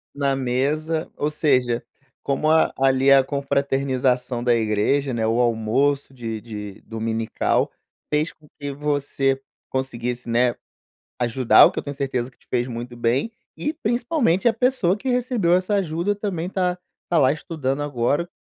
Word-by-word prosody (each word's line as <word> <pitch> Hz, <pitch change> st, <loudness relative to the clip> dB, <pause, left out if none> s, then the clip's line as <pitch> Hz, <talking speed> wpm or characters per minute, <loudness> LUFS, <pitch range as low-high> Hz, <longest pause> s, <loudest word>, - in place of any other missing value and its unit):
Na 140 Hz, -1 st, +1 dB
mesa, 145 Hz, +5 st, -1 dB
ou 150 Hz, -, -1 dB
seja, 130 Hz, -6 st, +1 dB, 0.4 s
como 140 Hz, +3 st, 0 dB
a 160 Hz, 0 st, +4 dB
ali, 135 Hz, 0 st, +4 dB
a 135 Hz, -1 st, +7 dB
confraternização 135 Hz, -3 st, 0 dB
da 120 Hz, -1 st, +3 dB
igreja, 115 Hz, +5 st, +1 dB
né, 115 Hz, -1 st, 0 dB
o 115 Hz, +2 st, +1 dB
almoço 125 Hz, +5 st, +1 dB
de 115 Hz, -4 st, -5 dB
de 105 Hz, -3 st, -8 dB
dominical, 110 Hz, 0 st, -1 dB, 0.4 s
fez 150 Hz, +2 st, +1 dB
com 155 Hz, -1 st, -23 dB
que 145 Hz, -1 st, -4 dB
você 140 Hz, -2 st, 0 dB, 0.3 s
conseguisse, 125 Hz, -2 st, -3 dB
né, 120 Hz, +1 st, +2 dB, 0.6 s
ajudar, 120 Hz, 0 st, +6 dB
o -, -, +3 dB
que -, -, -3 dB
eu -, -, -7 dB
tenho 140 Hz, -1 st, -6 dB
certeza 130 Hz, -3 st, -2 dB
que 130 Hz, -, -28 dB
te -, -, -29 dB
fez 120 Hz, 0 st, 0 dB
muito 120 Hz, 0 st, -6 dB
bem, 120 Hz, -, 0 dB, 0.3 s
e 300 Hz, +2 st, -2 dB
principalmente 240 Hz, -, +1 dB
a 230 Hz, -, +4 dB
pessoa 230 Hz, -6 st, +2 dB
que 260 Hz, -, -7 dB
recebeu 245 Hz, -8 st, +1 dB
essa 185 Hz, +3 st, +2 dB
ajuda 175 Hz, +1 st, 0 dB
também 190 Hz, -4 st, -3 dB
tá 180 Hz, -2 st, 0 dB, 0.3 s
tá 175 Hz, -, +2 dB
lá 130 Hz, -2 st, +5 dB
estudando 145 Hz, -2 st, -3 dB
agora. 145 Hz, +3 st, 0 dB
135 Hz, 155 wpm, -23 LUFS, 120-160 Hz, 0.6 s, a